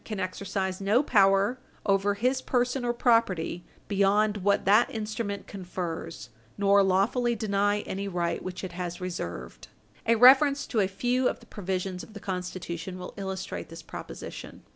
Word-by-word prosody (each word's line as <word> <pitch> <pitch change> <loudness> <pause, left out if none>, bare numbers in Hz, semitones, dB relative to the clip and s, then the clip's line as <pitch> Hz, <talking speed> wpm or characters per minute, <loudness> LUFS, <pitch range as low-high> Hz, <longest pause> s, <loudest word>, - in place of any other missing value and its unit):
450 215 - -5
can 190 - -1
exercise 190 0 -3
no 210 +7 +3
power 200 +1 +3 0.3
over 200 0 +2
his 255 +5 +1
person 250 +1 0
or 240 - +1
property 230 -8 +1 0.2
beyond 205 +1 +2
what 200 +1 +1
that 210 +5 +5
instrument 215 -2 -4
confers, 175 -7 -6 0.3
nor 200 0 +5
lawfully 205 +6 +2
deny 205 -1 +1
any 200 0 -4
right 170 -3 -1
which 185 +1 -6
it 185 - -4
has 175 0 -5
reserved. 85 - -6 0.4
A 230 - +5
reference 275 +4 +6
to 230 - -1
a 195 - +3
few 245 +6 +1
of - - -5
the 235 - -17
provisions 190 -3 -3
of 220 - -12
the 210 - -8
Constitution 180 -1 -5
will 180 - -8
illustrate 190 -4 -5
this 165 0 -10
proposition. - - -9
200 Hz, 160 wpm, -28 LUFS, 185-220 Hz, 0.4 s, reference